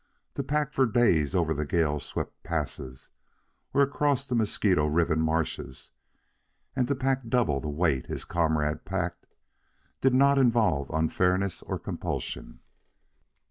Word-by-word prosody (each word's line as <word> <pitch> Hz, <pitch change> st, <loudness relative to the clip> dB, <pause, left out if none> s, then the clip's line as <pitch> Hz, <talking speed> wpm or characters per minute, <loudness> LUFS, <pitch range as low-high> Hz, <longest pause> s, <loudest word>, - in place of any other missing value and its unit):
To -, -, -2 dB
pack 150 Hz, 0 st, -1 dB
for 130 Hz, -1 st, +3 dB
days 100 Hz, -, +2 dB
over 85 Hz, -3 st, +2 dB
the 75 Hz, 0 st, -2 dB
gale 75 Hz, -1 st, +1 dB
swept -, -, -5 dB
passes 70 Hz, -5 st, -5 dB, 0.6 s
or 140 Hz, -, +4 dB
across 140 Hz, -1 st, +1 dB
the 130 Hz, -, -4 dB
mosquito 100 Hz, -8 st, +2 dB
ridden 80 Hz, +1 st, +2 dB
marshes, 80 Hz, -5 st, -2 dB, 0.8 s
and 125 Hz, -2 st, +1 dB
to 140 Hz, -, 0 dB
pack 130 Hz, -1 st, -1 dB
double 110 Hz, -, +2 dB
the 75 Hz, -, -5 dB
weight 75 Hz, -4 st, 0 dB
his -, -, -4 dB
comrade 80 Hz, -3 st, 0 dB
packed, 90 Hz, 0 st, -3 dB, 0.7 s
did 130 Hz, -1 st, +3 dB
not 140 Hz, +1 st, +5 dB
involve 115 Hz, -, +2 dB
unfairness 90 Hz, +4 st, +1 dB
or -, -, -4 dB
compulsion. -, -, -5 dB
85 Hz, 135 wpm, -27 LUFS, 75-125 Hz, 0.8 s, not